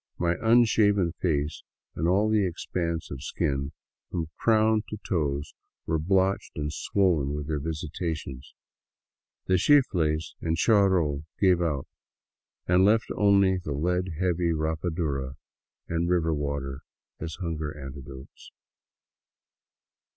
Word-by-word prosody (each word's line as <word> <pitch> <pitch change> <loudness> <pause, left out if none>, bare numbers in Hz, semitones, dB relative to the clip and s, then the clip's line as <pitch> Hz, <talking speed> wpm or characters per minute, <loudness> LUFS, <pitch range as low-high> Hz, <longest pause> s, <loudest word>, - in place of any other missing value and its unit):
My 85 -1 +1
unshaven 110 -5 +4
face 75 -3 0 0.3
and 80 - -1
all 100 +4 +3
the 110 -1 +3
expanse 85 -1 -3
of 65 - -6
skin 70 +1 -2 0.4
from 80 -3 -3
crown 110 -1 +3
to 105 - -5
toes 75 -6 -1 0.3
were 80 -1 0
blotched 95 +4 +1
and 75 0 -3
swollen 80 -5 +1
with 75 -1 -4
their 75 -2 -1
visitations. 80 -3 -5 0.9
The 95 -1 +2
chifles 85 - +2
and 80 0 -1
charol 90 -8 +3
gave 90 -3 +4
out 75 -6 -1 0.8
and 90 +1 +4
left 110 +3 +3
only 100 -2 +4
the 75 -5 -4
lead 90 +4 -1
heavy 90 -2 +1
rapadura 80 -4 -2 0.5
and 85 +1 -1
river 85 -2 +2
water 70 -2 -3 0.4
as 80 0 -5
hunger 80 -4 -4
antidotes. 70 -1 -10
85 Hz, 115 wpm, -27 LUFS, 75-95 Hz, 0.9 s, unshaven